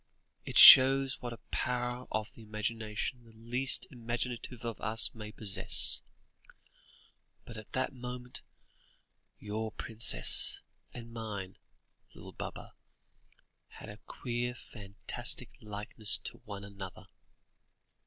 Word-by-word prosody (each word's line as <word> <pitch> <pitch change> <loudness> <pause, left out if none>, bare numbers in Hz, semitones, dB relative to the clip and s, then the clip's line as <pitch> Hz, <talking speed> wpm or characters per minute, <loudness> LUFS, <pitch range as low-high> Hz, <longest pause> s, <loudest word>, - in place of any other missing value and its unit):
It - - -3
shows 135 0 +9
what 120 - -6
a 115 - -8
power 125 0 -3
of 110 0 -4
imagination 110 +2 -5
the 115 -1 -19
least 120 +4 +1
imaginative 120 0 -5
of 115 -3 -6
us 110 +1 +2
may 105 -2 -9
possess; 105 -3 +3 1.4
but 115 - -11
at 110 0 -12
that 130 +1 -2
moment, 125 0 -9 1.0
your 110 +1 -5
princess 110 - +3 0.3
and 115 -1 -11
mine, 105 -5 -7 0.6
little - - -12
Baba, - - -9 0.9
had - - -13
a - - -11
queer 120 0 -4
fantastic 100 -5 -2
likeness 105 0 -2
to - - -4
one 100 -1 -8
another." 100 -2 -10
115 Hz, 105 wpm, -31 LUFS, 105-125 Hz, 1.4 s, shows